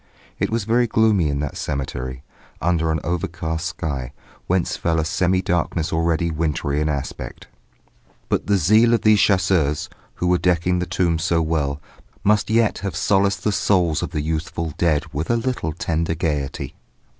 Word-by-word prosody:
It - - 0
was 115 -1 -1
very 120 +3 +2
gloomy 110 -7 +3
in 70 0 -1
that 75 - -4
cemetery, 65 -2 -4 0.4
under 80 -1 +1
an 80 - 0
overcast 80 -1 -2
sky, 70 -6 -4 0.3
whence 90 -1 +1
fell 80 -1 0
a 80 - 0
semi 90 +3 +1
darkness 85 -2 -1
already 85 0 +1
wintry 75 -2 -1
in 75 - +1
aspect. 70 -2 -5 0.8
But - - -1
the 100 -1 +3
zeal 110 +7 +5
of - - -2
these 110 -1 +5
chasseurs, 85 -6 +2 0.3
who - - -3
were 90 0 +3
decking 90 +1 +2
the 90 - -2
tombs 85 -2 0
so 85 -3 +2
well, 75 -3 -1 0.4
must 105 0 +3
yet 115 -1 +2
have 100 -5 -4
solaced 100 +3 +2
the 105 - +2
souls 90 -6 +2
of - - -3
the 75 - -2
youthful 80 +1 -3
dead 80 -4 +2
with 75 +3 -3
a 120 - +3
little 115 -9 -2
tender 80 +1 -1
gaiety. 75 -4 -2
85 Hz, 170 wpm, -22 LUFS, 75-95 Hz, 0.8 s, zeal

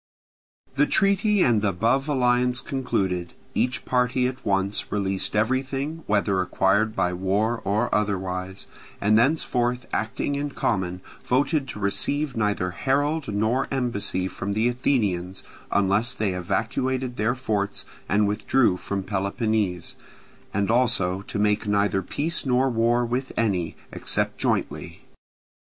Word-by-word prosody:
The 145 +1 +4
treaty 200 +1 +3
and 110 -4 +3
above 115 - +1
alliance 125 -2 +2
concluded, 95 - -2 0.2
each 125 -2 0
party 125 0 +1
at 130 +1 -3
once 100 0 0
released 95 -1 -1
everything 135 +7 -1
whether 100 -2 +2
acquired 100 +4 +1
by 90 0 +1
war 100 +6 0
or 105 +5 0
otherwise, 95 -2 -2 0.3
and 105 +2 +3
thenceforth 125 -1 +2
acting 115 +5 -1
in 145 +1 -2
common 95 -3 -1 0.2
voted 135 +2 +1
to 110 - -7
receive 140 +8 0
neither 105 -5 0
herald 145 - 0
nor 110 +6 +1
embassy 110 -8 -1
from 100 +1 -4
the 110 +3 +2
Athenians 105 -8 0 0.3
unless 100 +6 +2
they 105 -3 0
evacuated 120 +7 -2
their 115 +4 +1
forts 105 -5 -2 0.2
and 105 +1 +3
withdrew 105 0 +2
from 100 +1 -3
Peloponnese, 100 -1 -1 0.6
and 100 +2 0
also 115 -7 +2
to 100 - -6
make 105 0 +1
neither 100 -1 +2
peace 160 - -2
nor 130 0 +2
war 120 +1 +2
with 125 +3 -2
any, 95 -7 0 0.2
except - - -2
jointly. - - -2
110 Hz, 125 wpm, -24 LUFS, 100-130 Hz, 0.6 s, The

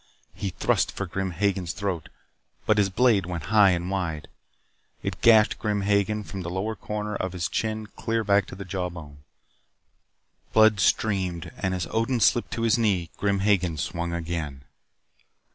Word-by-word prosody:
He 100 - -4
thrust 90 - +1
for 100 - -4
Grim 95 +1 -3
Hagen's 95 -1 -1
throat, 95 -5 -3 0.6
but 110 -1 +3
his 100 -1 +3
blade 105 -3 +3
went 85 -4 -4
high 105 -2 +7
and 90 0 -1
wide. 85 -6 -3 0.7
It - - -4
gashed 110 -2 +5
Grim 105 -1 -1
Hagen 100 +1 +1
from 95 -1 -7
the 85 - -5
lower 95 +5 -2
corner 105 0 -4
of 95 -1 -3
his 90 -2 -2
chin 110 -1 -2
clear 115 +1 -2
back 100 -1 +3
to - - -9
the 100 +1 -8
jawbone. 85 -6 -5 1.3
Blood 110 -1 +5
streamed 95 -5 0
and 95 -1 -2
as 90 -2 -2
Odin 115 +2 0
slipped 115 +3 +3
to 115 - -2
his 115 0 +3
knee 95 -7 +1
Grim 100 -1 0
Hagen 95 -5 +2
swung 85 +4 -3
again. 80 -5 -4
95 Hz, 160 wpm, -25 LUFS, 90-105 Hz, 1.3 s, high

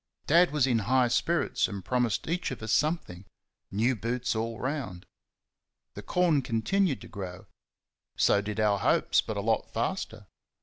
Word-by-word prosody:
Dad 170 +4 +5
was 145 -3 +2
in 120 -4 +2
high 130 -2 +4
spirits 170 +7 +1
and 100 -3 -7
promised 125 -5 0
each 175 +3 -1
of 125 -4 -7
us 110 - -3
something 150 - 0 0.5
new 115 +6 +1
boots 120 +2 -2
all 115 0 -3
round. 130 -10 -4 0.9
The - - -8
corn 175 -5 +2
continued 135 - 0
to - - -10
grow 90 -2 -8 0.7
so 100 - +4
did 105 +1 -5
our 105 -2 +2
hopes, - - +2
but 110 - -5
a - - -1
lot 110 +1 0
faster. - - -3
120 Hz, 160 wpm, -28 LUFS, 105-145 Hz, 0.9 s, Dad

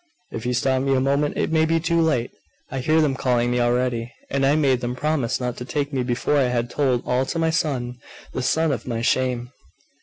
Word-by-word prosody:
If 115 +1 -5
you 125 - 0
stop 130 +2 +1
me 135 0 +1
a - - +3
moment, 140 +2 +1
it - - 0
may 160 -1 +3
be 165 +1 +2
too 170 +1 +1
late. 135 -7 +1 0.4
I 135 - -3
hear 155 +5 +3
them 150 -3 +2
calling 120 -2 +1
me 125 - +1
already; 120 -1 0 0.2
and 135 0 +2
I 145 - +4
made 135 -5 +2
them 120 0 -3
promise 140 -3 0
not 125 -1 -3
to - - -5
take 145 +3 -2
me 130 - 0
before 125 +4 0
I 135 - +4
had 120 -1 -1
told 130 -4 +1
all 125 +1 +1
to - - -3
my 165 0 +2
son 125 -7 -1 0.3
the - - -2
son 160 +5 +1
of 135 - -4
my 115 -2 -2
shame! 125 -1 0
130 Hz, 235 wpm, -23 LUFS, 125-150 Hz, 0.4 s, I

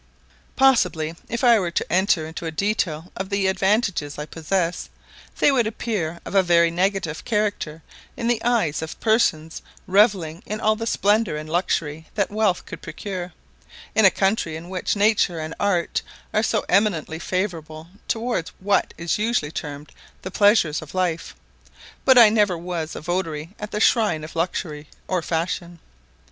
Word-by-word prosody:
Possibly, 180 -12 +3 0.2
if 235 +3 -3
I 235 -3 +6
were 180 -3 -1
to 170 - -2
enter 185 -3 +2
into 160 +1 -6
a - - -3
detail 175 -3 -1
of 190 0 -4
the 200 -1 0
advantages 190 -5 +1
I 150 - -4
possess, 170 +3 -2 0.5
they - - +4
would 245 -5 +2
appear 200 -7 -3
of - - -7
a 195 - +6
very 170 -2 +4
negative 180 -3 -1
character 205 -8 -2 0.3
in 230 - -2
the 240 -2 +1
eyes 225 -12 +1
of 160 0 -7
persons 165 -8 +1 0.2
revelling 190 -5 +2
in 215 +1 -3
all 215 0 +2
the 225 +1 -4
splendour 205 -5 +2
and 155 0 -6
luxury 160 -2 -1
that 200 -2 0
wealth 210 -4 +1
could - - -9
procure, 185 -3 -6 0.6
in 220 - +3
a 195 - +9
country 195 -4 0
in 165 +2 -8
which 185 +2 -1
nature 200 -5 +2
and 155 +1 -5
art 180 -4 0 0.3
are 215 - +3
so 225 - 0
eminently 180 -5 +1
favourable 165 -4 -3 0.2
towards 230 -7 -2
what 200 +1 0
is 170 +4 -1
usually 215 -9 0
termed 145 -1 -6 0.3
the 185 - -5
pleasures 205 -7 +3
of 155 +3 -11
life; 175 -3 -1 0.7
but 260 -1 +6
I 230 -3 +9
never 210 -5 +2
was 165 -2 -4
a - - -6
votary 165 -2 -3
at 210 - -5
the 210 - -3
shrine 210 -9 +3
of 155 - -9
luxury 160 -3 -3 0.2
or 185 -2 0
fashion. 170 +1 -3
185 Hz, 165 wpm, -23 LUFS, 160-210 Hz, 0.7 s, a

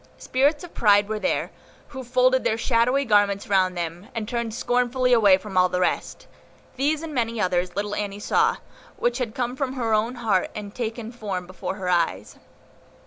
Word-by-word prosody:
Spirits 285 +4 +1
of 350 - -10
Pride 205 -2 +4
were 215 0 -3
there, 275 - -1 0.4
who 265 -3 -7
folded 255 +1 +2
their 220 - +1
shadowy 250 +4 +2
garments 205 -3 +2
round 185 -2 +2
them, 170 +3 -5
and 220 -2 -3
turned 235 -1 -2
scornfully 250 +2 +1
away 205 -5 +6
from 195 0 -9
all 180 0 +4
the 180 - -1
rest. 180 - -2 0.5
These 295 +4 0
and 320 -2 -6
many 230 -3 -1
others 180 -2 0
little 205 0 -2
Annie 205 -1 -3
saw, 205 - +1 0.4
which 240 +1 0
had 230 -4 -3
come 245 0 -2
from 265 -1 -2
her 235 -4 -1
own 225 +4 +1
heart, 215 -6 0
and 205 -1 -7
taken 230 -1 -4
form 200 -6 -5
before 185 +1 -5
her 190 -2 -5
eyes. 135 - 0
220 Hz, 185 wpm, -24 LUFS, 200-250 Hz, 0.5 s, away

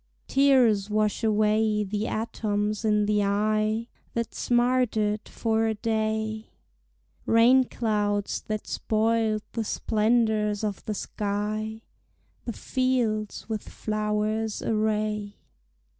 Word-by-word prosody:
Tears 250 -7 +4
wash 215 +1 0
away 215 0 +2
the 210 +2 -2
atoms 210 -1 -2
in 210 -1 +2
the 210 0 +2
eye 215 +2 +1 0.3
That 235 -1 -2
smarted 240 -4 +1
for 225 -1 0
a 220 - 0
day; 220 0 -2 0.8
Rain 245 +3 +5
clouds 210 -4 -1
that 215 -1 -3
spoiled 220 -1 0
the 230 - -2
splendors 215 -1 +1
of 205 -2 -3
the 215 - -2
sky 215 +2 -3 0.6
The 235 - -3
fields 235 -6 -1
with 220 -2 -4
flowers 215 0 -2
array. 215 -1 -1
215 Hz, 100 wpm, -26 LUFS, 210-225 Hz, 0.8 s, Rain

